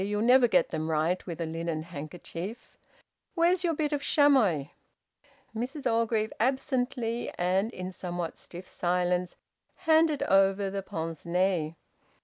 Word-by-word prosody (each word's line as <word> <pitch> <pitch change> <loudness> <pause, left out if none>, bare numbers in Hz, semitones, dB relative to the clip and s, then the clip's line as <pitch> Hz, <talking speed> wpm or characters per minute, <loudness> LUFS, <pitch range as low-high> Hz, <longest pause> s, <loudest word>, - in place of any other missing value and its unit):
You'll 205 +2 -1
never 250 +1 +6
get 180 -6 +3
them 155 +1 -3
right 160 +3 +1
with 170 -2 -5
a 165 - -1
linen 165 0 -3
handkerchief. 170 - -7 0.6
Where's 350 +1 +3
your 335 -2 +1
bit 300 -1 -1
of 290 - -1
chamois?" 240 - +3 0.9
Mrs 265 +6 -4
Orgreave 225 -2 +1
absently 250 -2 -1
and 190 +5 +1
in 185 -2 -6
somewhat 175 -2 -5
stiff 180 +1 -10
silence 180 0 0 0.5
handed 315 -2 +4
over 195 0 +3
the 195 0 -3
pince 165 -3 -5
nez! 175 -3 +1
195 Hz, 130 wpm, -28 LUFS, 175-245 Hz, 0.9 s, never